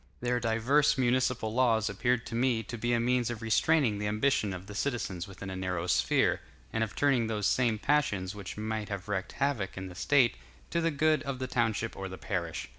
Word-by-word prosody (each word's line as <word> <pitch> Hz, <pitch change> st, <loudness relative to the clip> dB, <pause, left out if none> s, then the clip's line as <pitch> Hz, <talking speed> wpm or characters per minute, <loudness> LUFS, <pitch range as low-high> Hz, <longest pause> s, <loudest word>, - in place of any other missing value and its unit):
Their 125 Hz, 0 st, 0 dB
divers 125 Hz, +7 st, +2 dB
municipal 125 Hz, -3 st, +1 dB
laws 115 Hz, -3 st, +3 dB
appeared 120 Hz, +4 st, 0 dB
to 125 Hz, -, -8 dB
me 120 Hz, -1 st, +1 dB
to 115 Hz, -, -6 dB
be 120 Hz, +1 st, -1 dB
a 120 Hz, -, +3 dB
means 125 Hz, 0 st, +1 dB
of 115 Hz, -1 st, -5 dB
restraining 115 Hz, -1 st, +2 dB
the 105 Hz, -, -1 dB
ambition 105 Hz, 0 st, +1 dB
of 95 Hz, 0 st, -6 dB
the 105 Hz, -, -9 dB
citizens 105 Hz, -6 st, -2 dB
within 95 Hz, 0 st, -8 dB
a -, -, -5 dB
narrow 90 Hz, -2 st, -2 dB
sphere, 90 Hz, -, +2 dB, 0.3 s
and 110 Hz, -, +1 dB
of 110 Hz, -, -5 dB
turning 130 Hz, -5 st, +2 dB
those 105 Hz, -2 st, -2 dB
same 120 Hz, -4 st, +2 dB
passions 105 Hz, -8 st, +1 dB
which 100 Hz, -1 st, -8 dB
might 110 Hz, 0 st, -3 dB
have 100 Hz, -1 st, -5 dB
worked 100 Hz, -2 st, -3 dB
havoc 130 Hz, -10 st, -1 dB
in 95 Hz, 0 st, -5 dB
the -, -, -9 dB
State, 125 Hz, -, +3 dB, 0.3 s
to 170 Hz, -, +1 dB
the 165 Hz, -, +2 dB
good 155 Hz, -1 st, +2 dB
of 140 Hz, -1 st, -4 dB
the 130 Hz, -, -3 dB
township 115 Hz, -3 st, -1 dB
or 95 Hz, 0 st, -5 dB
the 95 Hz, -, -7 dB
parish. 85 Hz, -4 st, -3 dB
115 Hz, 210 wpm, -30 LUFS, 100-130 Hz, 0.3 s, laws